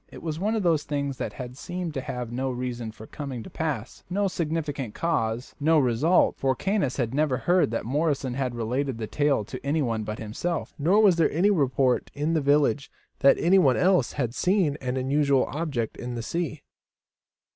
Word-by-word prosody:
It -, -, -11 dB
was 160 Hz, -1 st, -3 dB
one 215 Hz, +4 st, 0 dB
of 215 Hz, -, 0 dB
those 165 Hz, -4 st, +3 dB
things 140 Hz, -2 st, -3 dB
that -, -, -4 dB, 0.2 s
seem 175 Hz, +4 st, -5 dB
to 140 Hz, -3 st, -3 dB
have 125 Hz, -5 st, -5 dB
no 130 Hz, +2 st, -2 dB
reason 120 Hz, -2 st, -4 dB
for 110 Hz, 0 st, -12 dB
coming 135 Hz, -3 st, -6 dB
to -, -, -11 dB
pass, 145 Hz, -8 st, -4 dB
no 200 Hz, +2 st, +1 dB
sufficient 150 Hz, -, -3 dB
cause 120 Hz, -8 st, -1 dB
and 145 Hz, -, -5 dB
no 165 Hz, 0 st, +6 dB
result, 140 Hz, +6 st, +3 dB
for 135 Hz, -1 st, +1 dB
Caius 190 Hz, -9 st, 0 dB, 0.2 s
never 145 Hz, -2 st, +1 dB
heard 175 Hz, 0 st, +2 dB
that 115 Hz, -1 st, -3 dB
Morrison 140 Hz, -1 st, 0 dB
had 125 Hz, -2 st, -2 dB
related 125 Hz, +3 st, -2 dB
the 110 Hz, -, -3 dB
tale 140 Hz, -2 st, +1 dB
to 130 Hz, +4 st, -8 dB
anyone 140 Hz, -6 st, 0 dB
but 105 Hz, +1 st, -5 dB
himself, 135 Hz, +11 st, -3 dB
nor 190 Hz, +9 st, +4 dB
was 190 Hz, -5 st, +5 dB
there 165 Hz, -, +4 dB
any 185 Hz, +7 st, +3 dB
report 135 Hz, -6 st, +1 dB
in 150 Hz, +3 st, 0 dB
the 160 Hz, -, +2 dB
village 145 Hz, 0 st, +2 dB, 0.3 s
that 140 Hz, -1 st, +6 dB
anyone 170 Hz, -7 st, +4 dB
else 180 Hz, -9 st, +3 dB
had 125 Hz, -5 st, -2 dB
seen 180 Hz, -2 st, +2 dB
an 130 Hz, 0 st, -2 dB
unusual 140 Hz, 0 st, +2 dB
object 140 Hz, -8 st, -3 dB
in 125 Hz, 0 st, -5 dB
the 115 Hz, -, -4 dB
sea. 160 Hz, +2 st, -3 dB
140 Hz, 190 wpm, -26 LUFS, 125-165 Hz, 0.3 s, no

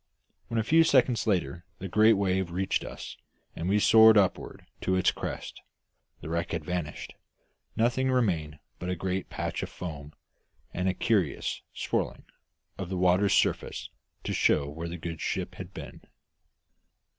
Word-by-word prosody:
When, 115 Hz, -, -3 dB
a 110 Hz, -, +2 dB
few 160 Hz, +8 st, +5 dB
seconds 130 Hz, -6 st, +3 dB
later, 90 Hz, -4 st, 0 dB
the 95 Hz, -, -6 dB
great 110 Hz, +4 st, +5 dB
wave 95 Hz, -3 st, 0 dB
reached 95 Hz, +3 st, -1 dB
us -, -, -8 dB, 0.4 s
and 85 Hz, +3 st, -3 dB
we 100 Hz, -, +3 dB
soared 110 Hz, +1 st, +7 dB
upward 95 Hz, -3 st, 0 dB, 0.2 s
to 95 Hz, -, +1 dB
its 95 Hz, -, +3 dB
crest, -, -, -6 dB, 0.6 s
the -, -, -7 dB
wreck 85 Hz, 0 st, -2 dB
had 80 Hz, -2 st, -3 dB
vanished, 85 Hz, -3 st, -4 dB, 0.6 s
nothing 125 Hz, +3 st, +1 dB
remaining 85 Hz, -12 st, 0 dB, 0.2 s
but 90 Hz, -, -4 dB
a 90 Hz, -, 0 dB
great 95 Hz, +2 st, -3 dB
patch -, -, -3 dB
of -, -, -4 dB
foam 75 Hz, -4 st, -7 dB, 0.6 s
and 90 Hz, +1 st, 0 dB
a 95 Hz, -, -1 dB
curious 95 Hz, -, 0 dB
swirling -, -, -2 dB, 0.5 s
of 90 Hz, -, -4 dB
the 95 Hz, -, -2 dB
water's 90 Hz, +2 st, +3 dB
surface -, -, 0 dB, 0.3 s
to -, -, -2 dB
show 70 Hz, -2 st, +2 dB
where 80 Hz, +4 st, -6 dB
the 85 Hz, -, -5 dB
good 80 Hz, -1 st, -6 dB
ship -, -, -2 dB
had -, -, -9 dB
been. -, -, -9 dB
95 Hz, 155 wpm, -28 LUFS, 85-110 Hz, 0.6 s, soared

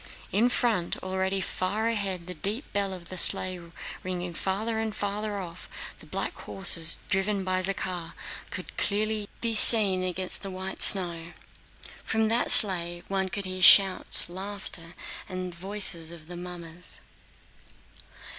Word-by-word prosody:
In 230 Hz, +5 st, +1 dB
front, 225 Hz, -9 st, -2 dB
already 190 Hz, +1 st, -3 dB
far 205 Hz, +5 st, -3 dB
ahead 195 Hz, -6 st, -4 dB
the 180 Hz, -, -8 dB
deep 205 Hz, -, -5 dB
bell 200 Hz, -1 st, -3 dB
of 180 Hz, -2 st, -11 dB
the 185 Hz, -, +1 dB
sleigh 185 Hz, +1 st, +6 dB, 0.4 s
ringing 180 Hz, -1 st, -7 dB
farther 215 Hz, +6 st, -4 dB
and 220 Hz, -1 st, -5 dB
farther 205 Hz, 0 st, -5 dB
off, 175 Hz, -2 st, -11 dB, 0.3 s
the -, -, -16 dB
black -, -, -5 dB
horses 170 Hz, -4 st, +2 dB
driven 195 Hz, +1 st, -2 dB
by 185 Hz, 0 st, -3 dB
Zakhár 180 Hz, -3 st, -2 dB, 0.4 s
could -, -, -8 dB
be -, -, -16 dB
clearly 215 Hz, 0 st, -3 dB, 0.2 s
seen 210 Hz, -4 st, +6 dB
against 185 Hz, 0 st, -5 dB
the 195 Hz, -, -8 dB
white 190 Hz, 0 st, -7 dB
snow. 175 Hz, -3 st, +3 dB, 0.7 s
From 220 Hz, 0 st, -2 dB
that 235 Hz, +2 st, 0 dB
sleigh 175 Hz, -4 st, +6 dB
one 190 Hz, -1 st, -3 dB
could 200 Hz, +2 st, -6 dB
hear 185 Hz, 0 st, -5 dB
the -, -, -8 dB
shouts, 195 Hz, 0 st, +6 dB
laughter, 185 Hz, -2 st, -7 dB, 0.3 s
and 185 Hz, -1 st, -7 dB
voices 180 Hz, -2 st, -4 dB
of 170 Hz, -2 st, -13 dB
the 175 Hz, +2 st, -11 dB
mummers. 175 Hz, -1 st, -1 dB
190 Hz, 145 wpm, -25 LUFS, 180-205 Hz, 0.7 s, sleigh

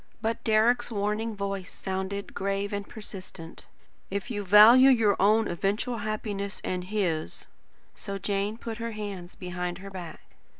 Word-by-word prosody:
But 230 Hz, +1 st, -2 dB
Deryck's 230 Hz, +3 st, +3 dB
warning 210 Hz, +1 st, -1 dB
voice 195 Hz, -2 st, -4 dB
sounded, 190 Hz, +1 st, -4 dB
grave 200 Hz, +1 st, -2 dB
and 200 Hz, 0 st, -4 dB
persistent: 185 Hz, -6 st, -9 dB, 0.4 s
"If 200 Hz, +5 st, -4 dB
you 205 Hz, -3 st, -2 dB
value 220 Hz, +7 st, +8 dB
your 225 Hz, -6 st, +4 dB
own 215 Hz, +3 st, +4 dB
eventual 210 Hz, +7 st, -1 dB
happiness 205 Hz, -2 st, -3 dB
and 180 Hz, -1 st, -2 dB
his 180 Hz, -, -2 dB, 0.2 s
" -, -, -37 dB
So 200 Hz, 0 st, -5 dB
Jane 200 Hz, +2 st, -1 dB
put 230 Hz, -1 st, -6 dB
her 230 Hz, 0 st, -3 dB
hands 200 Hz, -4 st, -6 dB
behind 180 Hz, -1 st, -4 dB
her 195 Hz, +1 st, -9 dB
back. 175 Hz, -4 st, -8 dB
200 Hz, 145 wpm, -28 LUFS, 190-220 Hz, 0.4 s, value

